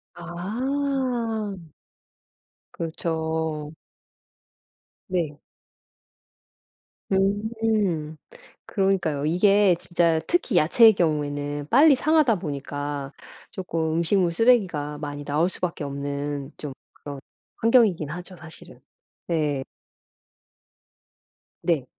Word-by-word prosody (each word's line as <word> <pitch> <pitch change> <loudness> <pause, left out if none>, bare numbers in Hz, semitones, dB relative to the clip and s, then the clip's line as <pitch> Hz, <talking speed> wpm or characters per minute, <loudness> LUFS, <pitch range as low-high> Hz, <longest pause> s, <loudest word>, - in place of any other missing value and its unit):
아. 230 +4 -2 1.2
그렇죠. 160 -2 -3 1.4
네. 165 -5 -1 1.7
음. 200 -5 0 0.5
그러니까요. 185 -8 0
이게 195 +3 +4
진짜 170 -2 +1
특히 330 - +1
야채의 220 +8 +6
경우에는 145 -4 -1
빨리 295 0 +7
상하다 300 -4 +3
보니까 145 -2 -4 0.4
쪼금 165 -4 -2
음식물 170 +1 +2
쓰레기가 180 -10 +2
많이 145 -1 -6
나올 155 +5 +1
수밖에 170 -4 -4
없는 140 0 -4
좀 145 -3 -6 0.8
그런 230 +1 +1
환경이기는 180 - +4
하죠 180 +1 -9
사실은. 155 -1 -12 0.5
네. 150 -5 0 2.0
네. 155 -7 +1
170 Hz, 175 characters per minute, -24 LUFS, 150-205 Hz, 2.0 s, 빨리